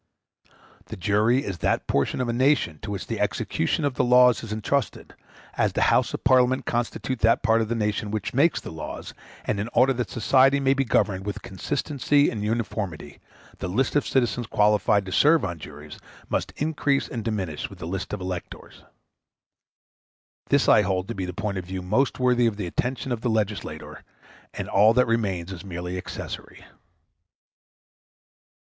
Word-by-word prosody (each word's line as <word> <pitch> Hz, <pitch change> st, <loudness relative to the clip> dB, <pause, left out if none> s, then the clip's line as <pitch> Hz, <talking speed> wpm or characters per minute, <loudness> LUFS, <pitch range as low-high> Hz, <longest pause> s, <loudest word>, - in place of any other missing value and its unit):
The -, -, -8 dB
jury 105 Hz, +8 st, +2 dB
is 95 Hz, -3 st, -5 dB
that -, -, 0 dB
portion 70 Hz, -, 0 dB
of -, -, 0 dB
the 120 Hz, -, -2 dB
nation 125 Hz, -, +2 dB
to -, -, -6 dB
which 100 Hz, -4 st, -4 dB
the -, -, -4 dB
execution 145 Hz, -, -1 dB
of 140 Hz, -, 0 dB
the 130 Hz, -, +1 dB
laws 125 Hz, -2 st, +5 dB
is 110 Hz, -, -7 dB
entrusted, 110 Hz, +4 st, -2 dB, 0.4 s
as -, -, 0 dB
the -, -, +1 dB
Houses -, -, +2 dB
of -, -, -8 dB
Parliament 130 Hz, 0 st, +3 dB
constitute 120 Hz, +1 st, -2 dB
that 115 Hz, +1 st, +3 dB
part 115 Hz, 0 st, +3 dB
of 110 Hz, -, -2 dB
the 120 Hz, -, 0 dB
nation 105 Hz, -1 st, -1 dB
which 105 Hz, -1 st, -3 dB
makes 150 Hz, +6 st, +3 dB
the -, -, -9 dB
laws; 80 Hz, -1 st, -7 dB, 0.3 s
and 100 Hz, -, -1 dB
in 105 Hz, +3 st, -3 dB
order 135 Hz, +1 st, +4 dB
that 120 Hz, -5 st, -3 dB
society 135 Hz, +7 st, +3 dB
may 135 Hz, -1 st, +3 dB
be 135 Hz, 0 st, +1 dB
governed 100 Hz, -6 st, +1 dB
with 105 Hz, 0 st, -5 dB
consistency 145 Hz, +6 st, 0 dB
and 105 Hz, -3 st, -4 dB
uniformity, 105 Hz, -9 st, -3 dB, 0.4 s
the -, -, -3 dB
list 115 Hz, +12 st, 0 dB
of 145 Hz, -, +2 dB
citizens 120 Hz, -2 st, 0 dB
qualified 105 Hz, -1 st, +2 dB
to 95 Hz, -, -7 dB
serve 150 Hz, -, +4 dB
on 85 Hz, -3 st, -5 dB
juries 75 Hz, 0 st, -10 dB, 0.3 s
must -, -, -1 dB
increase 145 Hz, -2 st, 0 dB
and 115 Hz, -2 st, -5 dB
diminish 95 Hz, -9 st, -3 dB
with -, -, -12 dB
the -, -, -7 dB
list 95 Hz, +3 st, -4 dB
of 105 Hz, -, -3 dB
electors. 90 Hz, -1 st, -7 dB, 1.7 s
This -, -, +3 dB
I -, -, +6 dB
hold 95 Hz, 0 st, -1 dB
to -, -, -2 dB
be 95 Hz, -3 st, -4 dB
the 90 Hz, -, -4 dB
point 100 Hz, +1 st, -3 dB
of 90 Hz, -, -7 dB
view 95 Hz, 0 st, -5 dB
most 110 Hz, +9 st, +1 dB
worthy 125 Hz, -1 st, +3 dB
of 105 Hz, -3 st, -2 dB
the 100 Hz, -, -3 dB
attention 125 Hz, +8 st, -3 dB
of 120 Hz, -2 st, -2 dB
the 120 Hz, -, 0 dB
legislator, 110 Hz, -2 st, -3 dB, 0.5 s
and -, -, -5 dB
all 105 Hz, +3 st, +4 dB
that 125 Hz, 0 st, +5 dB
remains 100 Hz, -6 st, -1 dB
is 95 Hz, -2 st, -8 dB
merely 90 Hz, -1 st, -5 dB
accessory. 90 Hz, -, -7 dB
110 Hz, 180 wpm, -25 LUFS, 95-125 Hz, 1.7 s, I